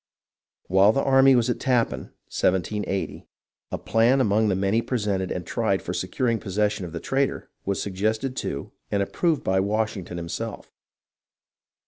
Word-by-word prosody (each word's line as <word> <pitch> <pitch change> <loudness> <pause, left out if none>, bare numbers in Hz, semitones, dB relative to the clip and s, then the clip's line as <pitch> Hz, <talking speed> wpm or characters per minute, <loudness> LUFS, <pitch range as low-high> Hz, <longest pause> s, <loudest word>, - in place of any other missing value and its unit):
While 95 +3 +5
the 135 - +1
army 135 0 +6
was 120 -1 +3
at 120 - -1
Tappan 125 -4 0 0.2
(1780) 95 +1 -1 0.4
a - - -1
plan, 115 +4 +3
among 110 -3 +3
the 95 - +2
many 100 +4 +1
presented 105 -7 -1
and 90 - -3
tried - - 0
for - - -4
securing 115 -3 0
possession 105 0 -1
of 85 - -8
the 85 - -5
traitor, 135 +7 -1
was 100 0 -1
suggested 110 +6 -1
to, 70 - -4 0.2
and 100 -1 +1
approved 165 - 0
by, 95 0 +2
Washington 100 -3 -1
himself. 85 -1 -5
105 Hz, 145 wpm, -25 LUFS, 95-120 Hz, 0.4 s, army